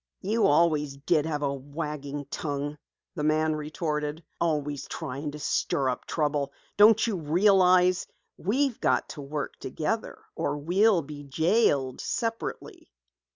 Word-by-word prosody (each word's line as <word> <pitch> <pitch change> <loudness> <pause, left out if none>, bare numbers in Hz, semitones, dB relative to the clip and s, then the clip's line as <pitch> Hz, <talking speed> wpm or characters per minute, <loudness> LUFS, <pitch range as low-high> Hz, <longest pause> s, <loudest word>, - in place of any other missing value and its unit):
"You 215 +4 +2
always 150 -2 +2
did 150 +2 +1
have 150 -2 -2
a 140 -1 0
wagging 145 0 -5
tongue," 145 -1 -3 0.3
the 160 - -4
man 155 +1 +2
retorted. 150 0 -3 0.2
"Always 145 -4 -1
trying 145 -1 -5
to 150 - -7
stir 140 -2 0
up 125 - -3
trouble. 145 -3 -1 0.2
Don't 215 +2 +6
you 225 -4 -1
realize 180 +2 +4 0.3
we've 255 +5 0
got - - +1
to 150 - -7
work 145 0 -4
together - - -3 0.2
or - - -1
we'll 180 +4 +3
be 145 0 -9
jailed 145 - +1
separately? 230 - -4
150 Hz, 130 wpm, -27 LUFS, 145-180 Hz, 0.3 s, Don't